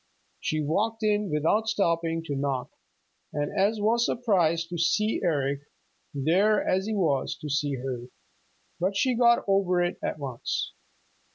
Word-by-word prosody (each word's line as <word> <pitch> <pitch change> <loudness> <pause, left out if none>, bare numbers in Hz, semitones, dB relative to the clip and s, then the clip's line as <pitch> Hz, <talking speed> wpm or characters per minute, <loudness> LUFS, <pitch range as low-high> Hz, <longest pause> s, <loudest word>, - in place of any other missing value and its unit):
She 155 0 -1
walked 220 +9 -1
in 210 -1 +1
without 165 +9 +1
stopping 165 -6 0
to 145 -3 -4
knock 135 -2 -2 0.6
and 145 0 -2 0.3
was 230 +2 +3
as - - +3
surprised 170 -8 +1
to 175 -1 -4
see 210 +6 +1
Eric 140 -5 0 0.5
there 180 +10 +2
as 190 +2 +1
he 220 - -1
was 155 -5 0
to 150 - -7
see 145 -1 0
her. 125 -2 -5 0.7
But 190 +3 0
she 260 +1 +2
got 235 0 +4
over 195 -2 +2
it 175 - -2
at - - -2
once. 135 -5 -3
170 Hz, 150 wpm, -27 LUFS, 145-210 Hz, 0.7 s, got